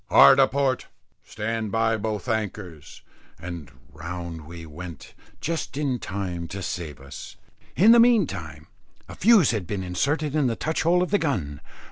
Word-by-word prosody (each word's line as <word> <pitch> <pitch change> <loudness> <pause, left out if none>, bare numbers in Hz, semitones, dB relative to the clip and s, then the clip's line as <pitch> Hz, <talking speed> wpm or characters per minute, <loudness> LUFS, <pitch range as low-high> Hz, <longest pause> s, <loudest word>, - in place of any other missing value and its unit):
"Hard 70 - +8
a 135 - +6
port, 135 -2 0 0.4
stand 110 0 -3
by 115 +1 +2
both 110 +1 -3
anchors," 100 - -4 0.4
and 85 -2 -7 0.2
round 85 -1 -7
we 85 0 -9
went 85 +2 -10 0.3
just 165 -4 -3
in 135 -4 -1
time 90 -4 -4
to 95 +2 -6
save 80 -6 -5
us. 70 0 -10 0.4
In 210 +6 +6
the 235 - +8
meantime 95 - +2 0.4
a - - -9
fuse 210 - +5
had 105 -7 -3
been 100 -3 -3
inserted 140 - -1
in 150 -4 +2
the 115 - -1
touch 160 +6 -2
hole 175 +2 +3
of 180 - -4
the 205 - +3
gun. 85 - -2
105 Hz, 160 wpm, -25 LUFS, 85-140 Hz, 0.4 s, Hard